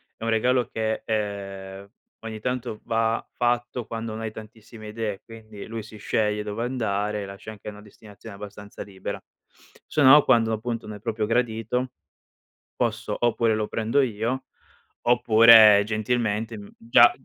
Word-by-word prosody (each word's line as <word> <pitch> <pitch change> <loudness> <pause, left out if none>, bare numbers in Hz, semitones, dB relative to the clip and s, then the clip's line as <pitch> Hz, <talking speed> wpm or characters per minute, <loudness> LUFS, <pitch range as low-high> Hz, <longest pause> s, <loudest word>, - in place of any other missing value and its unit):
è - - -11
un 115 - -1
regalo 125 +2 +2
che, 110 0 -2
ehm, 100 -2 -4 0.3
ogni 110 -1 -7
tanto 125 -2 -3
va 115 0 0
fatto 120 0 -1
quando 115 0 -5
non 110 - -6
hai 110 -1 -4
tantissime 110 0 -12
idee, 105 -2 -4
quindi 110 -2 -11
lui 115 -1 -6
si 110 0 -12
sceglie 105 0 -1
dove 105 +2 -4
andare, 105 -4 -2
lascia 100 +2 -9
anche 105 -1 -13
una 105 0 -8
destinazione 105 0 -13
abbastanza 105 0 -9
libera. 95 -2 -7 0.6
Se 150 - -1
no 145 +2 +8
quando, 115 -3 +3
appunto, 115 +1 -4
non 105 - -7
è - - -10
proprio 110 -2 -2
gradito, 120 +2 -1 0.9
posso 115 -1 -2
oppure 115 -2 +2
lo 110 -1 -2
prendo 115 +6 +1
io, 120 +2 -2 0.6
oppure 115 -3 +7
gentilmente 110 0 -1 0.2
già 120 +1 +6
110 Hz, 145 wpm, -25 LUFS, 105-115 Hz, 0.9 s, no